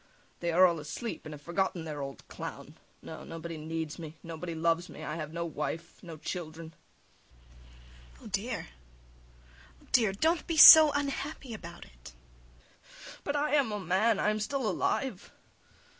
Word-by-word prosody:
They 170 0 -1
are 180 +3 +6
all 170 -3 +2
asleep, 155 +6 -6
and 155 - -8
have 145 - -15
forgotten 175 +1 -1
their 150 -2 -5
old 135 -1 -8
clown. - - -8 0.3
No, - - -9
nobody 165 0 -7
needs 160 0 -5
me, 160 -1 -9
nobody 165 +1 -6
loves 165 +2 0
me; - - -10
I 155 - -4
have 155 -2 -6
no 170 +1 -3
wife, 165 +1 -5
no 165 -3 -9
children. 160 0 -7 1.4
IVANITCH. - - -19
Oh, - - -9
dear! - - -3 1.1
Oh, - - -23
dear! 225 -5 +4
Don't 320 - 0
be 330 -2 -2
so 310 0 +11
unhappy 280 -2 -3
about 170 -5 -9
it. - - -15 0.7
SVIETLOVIDOFF. - - -15
But 285 - -2
I 290 +1 0
am 275 -7 +2
a 210 - -3
man, 195 +5 +2
I 210 - +2
am 215 - -2
still 260 +3 -2
alive. 210 +2 -2
170 Hz, 165 wpm, -30 LUFS, 160-220 Hz, 1.4 s, so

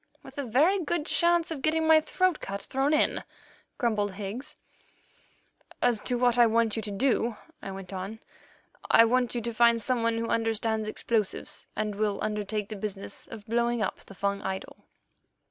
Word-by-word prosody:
"With - - -10
a - - -1
very 315 - +3
good 310 0 -1
chance 340 0 +3
of 300 -4 -4
getting 320 +1 +2
my 315 0 +6
throat 365 +2 +1
cut 200 +1 -5
thrown 270 +2 0
in," 305 - +2 0.5
grumbled 210 -5 0
Higgs. 205 +7 -6 1.2
"As 240 -3 +2
to 245 - +1
what 245 0 +3
I 240 - +7
want 225 -1 +2
you 225 - -2
to 215 - -5
do," 230 +1 0 0.2
I - - -6
went 195 0 -7
on, 195 +4 -5 0.7
"I 230 - +7
want 245 +1 +1
you 240 - -1
to 235 +1 -4
find 235 0 +4
someone 230 0 0
who 230 - -1
understands 225 -1 0
explosives, 215 -1 -2
and 215 0 -1
will 205 0 0
undertake 210 -1 -2
the 215 - -5
business 200 -1 -5
of 215 -2 -10
blowing 235 0 +1
up - - -3
the 195 - -14
Fung 200 +1 -1
idol." 190 0 -5
230 Hz, 175 wpm, -28 LUFS, 210-250 Hz, 1.2 s, I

